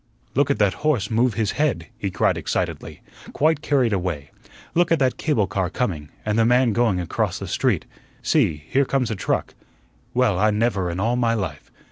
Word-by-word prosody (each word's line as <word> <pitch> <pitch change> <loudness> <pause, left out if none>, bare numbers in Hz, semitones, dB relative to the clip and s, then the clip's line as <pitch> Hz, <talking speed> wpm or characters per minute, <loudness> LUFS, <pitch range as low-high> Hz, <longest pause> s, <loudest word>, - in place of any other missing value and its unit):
"Look 140 +2 +2
at 140 - +2
that 105 -3 +3
horse 150 -11 +1
move 115 0 +2
his 110 -2 0
head," 135 - 0
he 100 - -3
cried - - +1
excitedly, - - -3 0.3
quite 155 0 +2
carried 130 -7 +2
away. 85 -7 -3 0.4
"Look 175 0 +2
at 165 - +5
that 130 -3 +1
cable 145 -10 +1
car 95 -2 -2
coming 85 -10 -3 0.2
and 105 +1 +1
the - - +5
man 120 0 +3
going 110 -5 +2
across 85 - -1
the - - -6
street. - - 0 0.4
See, 75 -2 +1
here 140 +1 +2
comes 130 -3 0
a - - -1
truck. - - -2 0.6
Well, 120 -7 +2
I 105 +2 +4
never 105 -4 0
in 85 +2 -4
all 115 +4 +1
my 115 -2 +2
life! 100 -4 -4
115 Hz, 190 wpm, -23 LUFS, 95-130 Hz, 0.6 s, at